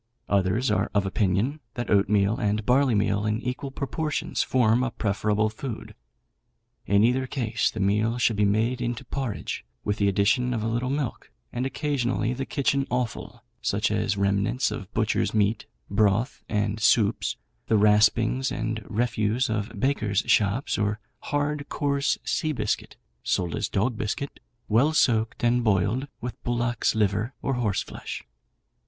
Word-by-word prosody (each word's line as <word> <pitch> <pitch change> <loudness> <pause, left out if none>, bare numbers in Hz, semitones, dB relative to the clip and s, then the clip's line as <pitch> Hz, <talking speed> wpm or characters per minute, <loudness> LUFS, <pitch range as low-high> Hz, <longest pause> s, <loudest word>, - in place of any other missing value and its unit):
Others 100 +6 +2
are - - +1
of 100 -1 +3
opinion 100 +9 0 0.2
that 120 - -3
oatmeal 100 0 +3
and 105 -3 0
barleymeal 115 -6 +2
in 105 +1 0
equal 125 +3 -4
proportions 145 +3 -2
form 120 -2 +3
a 130 - 0
preferable 105 0 0
food. 115 +1 -6 0.9
In 100 +1 +4
either 130 +3 +2
case 115 -4 0
the 110 - -7
meal 105 +4 +1
should 120 -2 +2
be 105 - +2
made 110 +5 +1
into 120 +1 -3
porridge, 130 -3 -4 0.2
with 105 0 -1
the 100 - +2
addition 110 +6 +2
of 110 - -2
a - - -1
little 120 +3 -1
milk, 140 -2 -3 0.2
and 125 +2 -1
occasionally 130 -4 -1
the 135 +1 -4
kitchen 140 -1 0
offal, 125 -3 -3 0.2
such - - 0
as 100 - 0
remnants 100 +6 +1
of 100 -3 -6
butchers' 110 0 +1
meat, 105 +1 +1 0.2
broth, 105 +4 +1
and 105 0 0
soups, 105 0 +2 0.3
the 110 - +3
raspings 110 +5 +3
and 110 -1 -3
refuse 115 +1 0
of 105 -1 -2
bakers' 105 -6 +1
shops, 105 +6 +2
or 105 0 0 0.2
hard, 145 0 -2
coarse, 140 -1 0
sea 155 -1 -1
biscuit 110 -6 -2 0.2
(sold 85 -4 -1
as - - -2
dog 110 +3 0
biscuit), 140 +7 -3 0.3
well 125 +9 +3
soaked 115 -7 +2
and 120 +1 +3
boiled 105 +5 +1
with 125 +1 -6
bullocks' 120 -1 0
liver 105 +3 0
or 135 - 0
horseflesh. 110 -6 -3
115 Hz, 150 wpm, -26 LUFS, 105-125 Hz, 0.9 s, In